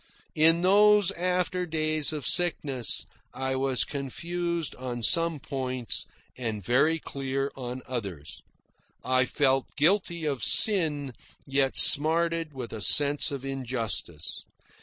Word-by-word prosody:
In 165 +2 +3
those 205 +1 +4
after 180 0 -2
days 155 -2 0
of 150 -3 -5
sickness, 145 - -1 0.3
I 130 0 -2
was 130 -2 +1
confused 170 +4 -4
on 125 -2 -6
some 165 +2 +3
points, 130 -3 -3 0.3
and 110 -6 -5
very 140 +8 +2
clear 135 -2 -4
on 125 0 -7
others. 100 - -7 0.6
I 130 0 +2
felt 135 -1 +1
guilty 170 +1 +1
of 140 -6 -2
sin, 155 - +2 0.3
yet 135 -1 0
smarted 165 +1 +4
with 130 -4 -8
a 110 - -6
sense 145 +7 +4
of 140 -2 -6
injustice. 115 - -4
140 Hz, 115 wpm, -27 LUFS, 130-165 Hz, 0.6 s, those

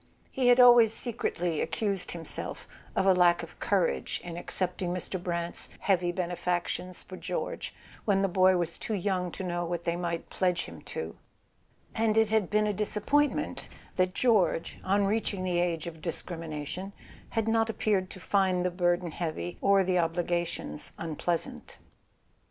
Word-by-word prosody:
He 260 -2 +1
had 245 +1 +6
always 240 -3 +8
secretly 175 -9 -2
accused 195 +2 -1
himself 165 -2 -6 0.3
of - - +2
a 190 - +7
lack 175 -1 +4
of 165 - -11
courage 190 -4 +1
in 170 -1 -6
accepting 180 0 -2
Mr. 180 +1 -4
Brant's 170 -1 -3
heavy 180 -3 +2
benefactions 180 0 -2
for 185 - -9
George - - -4 0.3
when 195 -2 +2
the - - +4
boy 185 0 +4
was 170 -1 -2
too 220 - -2
young 185 -2 -1
to 190 - -5
know 175 -1 -1
what 170 0 -3
they 170 0 0
might 170 -1 -3
pledge 180 -2 +1
him - - -10
to; - - -5 0.8
and 220 -1 +1
it 220 -1 +5
had 220 -5 +2
been 210 0 +3
a 210 - +1
disap¬ 210 +1 -3
pointment 290 0 +1 0.3
that 185 0 +1
George, 210 -9 +2
on 200 +1 +2
reaching 200 -2 -1
the 180 -1 +1
age 170 -3 0
of 165 -2 -7
dis¬ 165 -1 -4
crimination, 165 +3 -5 0.4
had 225 -1 +2
not 225 0 +2
appeared 200 -3 +1
to - - -10
find 185 -2 +2
the 180 - +1
burden 175 -1 +1
heavy, 170 +1 -4
or 195 -1 +5
the 185 -1 +2
obligations 170 - -2
unpleasant. 165 +1 -3
180 Hz, 165 wpm, -29 LUFS, 175-200 Hz, 0.8 s, always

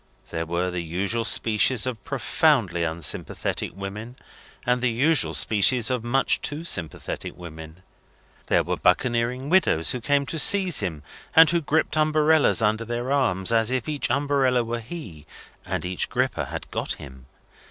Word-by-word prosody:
There 80 -1 -4
were 90 +2 -2
the 90 -1 -3
usual 95 +8 -2
species 110 +2 +3
of 125 -4 -5
profoundly 130 - +1
unsympathetic 80 -1 -1
women, 105 +5 -7 0.5
and 125 0 +1
the 125 - +1
usual 140 +7 +1
species 115 +3 +3
of 125 -3 -2
much 130 +3 +1
too 150 +3 -4
sympathetic 90 - -3
women. 80 0 -11 0.6
There - - +2
were - - -3
buccaneering 125 +2 0
widows 130 - +3
who 125 - -4
came 140 +2 +1
to 160 +4 -4
seize 190 +1 +5
him, 80 -7 -4 0.3
and 160 -1 +7
who 170 -1 +1
griped 155 +1 -1
umbrellas 155 -4 +3
under 110 +1 +1
their 120 +3 -4
arms, 115 -9 +1
as 115 0 +2
if 130 -2 -2
each 150 -2 -2
umbrella 135 -2 +1
were 115 +1 -4
he, 110 - -10 0.4
and - - -3
each 90 0 -3
griper - - -1
had - - -8
got - - -2
him. 65 -3 -13
120 Hz, 155 wpm, -24 LUFS, 90-140 Hz, 0.6 s, and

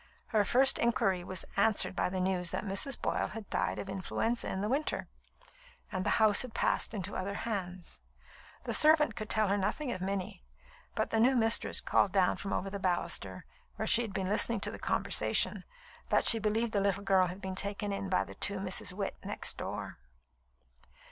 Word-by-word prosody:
Her 215 -3 +2
first 265 +6 +4
inquiry 195 -6 0
was 185 0 -2
answered 200 -1 +4
by - - -1
the 185 0 -4
news 180 -1 -1
that - - -4
Mrs. 200 +7 0
Boyle - - -2
had 220 -2 -9
died 95 +1 -1
of 105 - -6
influenza 225 +5 -2
in 190 - -4
the 205 - -2
winter, 280 +6 -2 0.8
and 185 - -3
the - - -1
house 215 -2 +4
had 250 -3 -6
passed - - 0
into 195 -1 -5
other 200 +2 -4
hands. 185 -6 -6 0.6
The - - -3
servant 305 0 +5
could 215 -3 -6
tell 215 -1 +2
her 200 +1 0
nothing 245 +8 -2
of 185 - -6
Minnie; 195 0 -4 0.5
but - - -2
the 225 - +1
new 255 +4 +3
mistress 225 -1 +2
called 195 - +1
down 190 -1 +1
from 195 - -6
over 195 - -3
the 200 - -5
baluster, 180 -2 -2 0.3
where - - -4
she 230 - +4
had 225 -3 -5
been 190 -1 -3
listening 215 +2 +1
to - - -3
the - - -9
conversation, - - 0 0.4
that - - +2
she 225 - +12
believed 220 +2 -1
the 200 - 0
little 200 0 -1
girl 190 -2 +3
had 180 +2 -8
been 190 -1 -6
taken 200 +1 -3
in 195 -1 -5
by 185 - +1
the - - -11
two 200 -1 -1
Misses 190 -1 -2
Witt 200 -1 -4
next - - -2
door. - - -7
200 Hz, 195 wpm, -30 LUFS, 185-225 Hz, 0.8 s, she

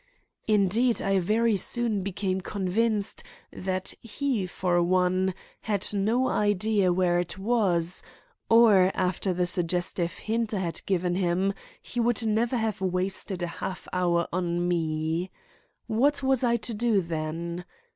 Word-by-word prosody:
Indeed, 215 +3 +2
I 195 -1 +1
very 220 +4 +2
soon 225 +1 +1
became 190 0 -2
convinced 205 +3 -1 0.3
that 185 0 -3
he, 230 -3 -2
for 175 -1 0
one, 185 +1 +1 0.2
had 205 -3 -1
no 225 +6 +1
idea 205 -1 +2
where 175 -1 +2
it 175 +1 -3
was, 190 -5 +1 0.5
or 215 -5 +6
after 185 +1 0
the 180 0 0
suggestive 175 0 -1
hint 225 0 -2
I - - -1
had 170 -2 -3
given 180 -2 +1
him 185 +2 +1 0.3
he 245 - -5
would 235 -1 +1
never 230 +3 +1
have 220 -3 -2
wasted 185 0 -1
a - - -1
half 185 - -5
hour 175 -2 +1
on 175 -1 0
me. 160 +1 -1 0.6
What 275 +6 +1
was 265 -1 +2
I 235 -1 +3
to 235 +1 -4
do 220 -2 +2
then? 165 +1 -4
190 Hz, 135 wpm, -27 LUFS, 180-220 Hz, 0.6 s, or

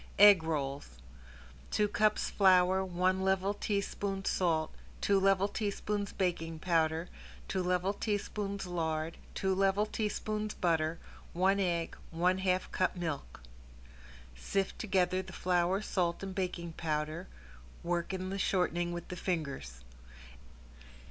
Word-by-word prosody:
~EGG 205 -3 +9
ROLLS~ 145 -3 -2 0.8
Two 210 - +2
cups 215 +1 +1
flour, 190 -1 +5
one 185 +1 +1
level 190 +1 +1
teaspoon 200 -1 -2
salt, 160 -4 +1 0.3
two 200 -1 +3
level 195 0 +3
teaspoons 205 0 -2
baking 165 -3 -1
powder, 160 0 +1 0.4
two 190 - -1
level 180 +2 +1
tablespoons 205 -1 -2
lard, 160 -2 -2 0.2
two 190 0 +1
level 195 +2 +2
tablespoons 215 0 -2
butter, 165 -2 +1 0.4
one 190 +3 +3
egg, 170 -3 0
one 180 +3 +1
half 185 -1 0
cup 185 - +1
milk. 160 - -4 0.9
Sift 195 - -2
together 185 -2 +1
the 190 0 -11
flour, 180 +3 +1
salt, 175 -3 -1
and 195 -1 -4
baking 180 -3 -3
powder, 155 +1 -3 0.6
work 170 0 -1
in 185 0 -3
the 195 - -3
shortening 175 -2 +1
with 175 -1 -5
the 180 - -4
fingers. 140 - -3
185 Hz, 120 wpm, -32 LUFS, 170-195 Hz, 0.9 s, ~EGG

